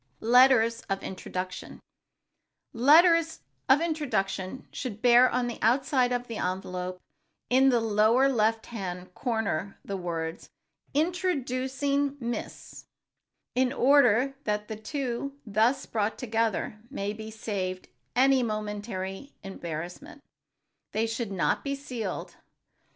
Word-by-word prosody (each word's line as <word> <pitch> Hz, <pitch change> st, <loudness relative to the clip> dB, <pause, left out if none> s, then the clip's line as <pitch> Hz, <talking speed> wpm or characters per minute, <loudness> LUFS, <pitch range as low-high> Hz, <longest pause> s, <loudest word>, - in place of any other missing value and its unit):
[Sidenote: 225 Hz, -, -3 dB
LETTERS 245 Hz, -3 st, +6 dB
OF 195 Hz, 0 st, -2 dB
INTRODUCTION] 185 Hz, 0 st, -6 dB, 0.9 s
Letters 325 Hz, +6 st, +5 dB, 0.3 s
of 270 Hz, +4 st, +6 dB
introduction 250 Hz, -, -2 dB
should 225 Hz, -5 st, -5 dB
bear 245 Hz, +1 st, +7 dB
on 250 Hz, 0 st, 0 dB
the 240 Hz, -, -5 dB
outside 255 Hz, +2 st, +2 dB
of 245 Hz, 0 st, -1 dB
the 230 Hz, -3 st, -6 dB
envelope, 180 Hz, 0 st, -3 dB, 0.5 s
in 265 Hz, +2 st, +5 dB
the 245 Hz, -2 st, +3 dB
lower 225 Hz, +4 st, +3 dB
left 225 Hz, -3 st, +1 dB
hand 180 Hz, -5 st, -6 dB
corner 205 Hz, -6 st, -2 dB
the 200 Hz, -, -4 dB
words, 165 Hz, -2 st, -4 dB, 0.5 s
"Introducing 285 Hz, -4 st, 0 dB
Miss 240 Hz, -1 st, -6 dB, 0.3 s
——," -, -, -56 dB
in 255 Hz, 0 st, +2 dB
order 270 Hz, -2 st, +4 dB
that 210 Hz, 0 st, -2 dB
the 220 Hz, -, -3 dB
two 265 Hz, +4 st, -4 dB
thus 225 Hz, +6 st, +2 dB
brought 215 Hz, -1 st, -1 dB
together 225 Hz, -3 st, -1 dB
may 205 Hz, -7 st, -3 dB
be 220 Hz, 0 st, -8 dB
saved 195 Hz, -4 st, -4 dB, 0.3 s
any 265 Hz, +1 st, +5 dB
momentary 210 Hz, +1 st, -4 dB
embarrassment. 175 Hz, -, -7 dB, 0.7 s
They 220 Hz, +1 st, +1 dB
should 225 Hz, -1 st, -3 dB
not 190 Hz, -, 0 dB
be 275 Hz, -1 st, -2 dB
sealed. 255 Hz, -5 st, -5 dB
230 Hz, 120 wpm, -28 LUFS, 200-265 Hz, 0.9 s, bear